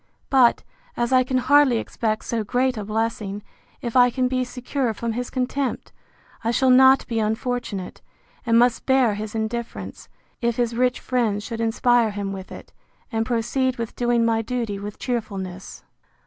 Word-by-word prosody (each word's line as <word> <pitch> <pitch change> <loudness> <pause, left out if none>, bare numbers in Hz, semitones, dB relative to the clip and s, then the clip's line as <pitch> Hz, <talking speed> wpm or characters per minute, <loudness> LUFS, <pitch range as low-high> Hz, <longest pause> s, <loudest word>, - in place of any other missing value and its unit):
But, 255 -3 +4 0.3
as 240 +2 0
I 255 0 +5
can 255 +1 -1
hardly 265 -1 +4
expect 220 -1 -2
so 230 -2 -1
great 250 +4 0
a 215 - -4
blessing, 215 -1 -3 0.4
if 235 -1 -4
I 245 -1 +6
can 255 +1 0
be 255 0 0
secure 250 -1 -3
from 230 +1 -3
his 245 +2 -4
contempt, 260 +1 -2 0.5
I 225 - 0
shall 260 +2 +3
not 265 +1 +6
be 230 -1 -2
unfortunate; 220 -3 -3 0.4
and 230 -1 +3
must 240 -1 +2
bear 260 -5 +4
his 210 +1 -6
indifference, 225 +2 -5 0.3
if 235 -1 +1
his 235 -1 -1
rich 250 +1 +1
friends 225 -5 -1
should 230 0 -5
inspire 230 0 +3
him 200 -1 -4
with 190 -1 -8
it, - - -11 0.4
and 225 -1 -1
proceed 255 +2 0
with 230 -2 -5
doing 240 -1 +2
my 225 -1 +2
duty 225 -4 -3
with 205 +1 -7
cheerfulness. 195 -6 -5
235 Hz, 165 wpm, -23 LUFS, 220-250 Hz, 0.5 s, I